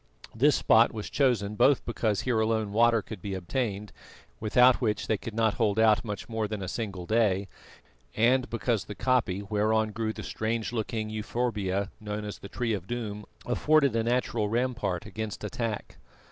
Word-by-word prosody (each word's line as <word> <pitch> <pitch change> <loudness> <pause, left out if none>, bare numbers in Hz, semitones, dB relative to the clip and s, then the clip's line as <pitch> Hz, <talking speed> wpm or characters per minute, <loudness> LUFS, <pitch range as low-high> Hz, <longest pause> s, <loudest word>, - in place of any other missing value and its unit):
This 140 +5 +4
spot 115 +1 +5
was 110 -2 -6
chosen 120 -7 +1
both 135 +6 +3
because 110 -3 0
here 120 -3 0
alone 110 -1 0
water 115 0 +3
could 105 -4 -9
be 100 -2 -4
obtained, 100 +2 -3 0.5
without 125 +4 +4
which 110 -4 0
they 110 - +1
could 115 - -7
not 110 -2 +2
hold 110 -4 +1
out 110 -1 +5 0.3
more 110 -2 -2
than 105 -2 -4
a - - -4
single 95 -3 -4
day, 100 -2 +2 0.7
and 125 +3 +3
because 115 -2 -1
the 105 - -7
koppie 115 -7 +1
whereon 110 +1 +1
grew 110 0 -2
the - - -8
strange 110 +1 -2
looking 110 -1 -2
euphorbia 105 -3 -2
known 105 0 -5
as 105 - -6
the 100 - -10
Tree 120 0 -1
of 95 -3 -4
Doom 105 -3 -4 0.2
afforded 140 +2 +3
a 115 - +2
natural 120 -3 0
rampart 120 -6 -1
against 110 -1 -6
attack. 110 0 -4
110 Hz, 170 wpm, -28 LUFS, 105-120 Hz, 0.7 s, spot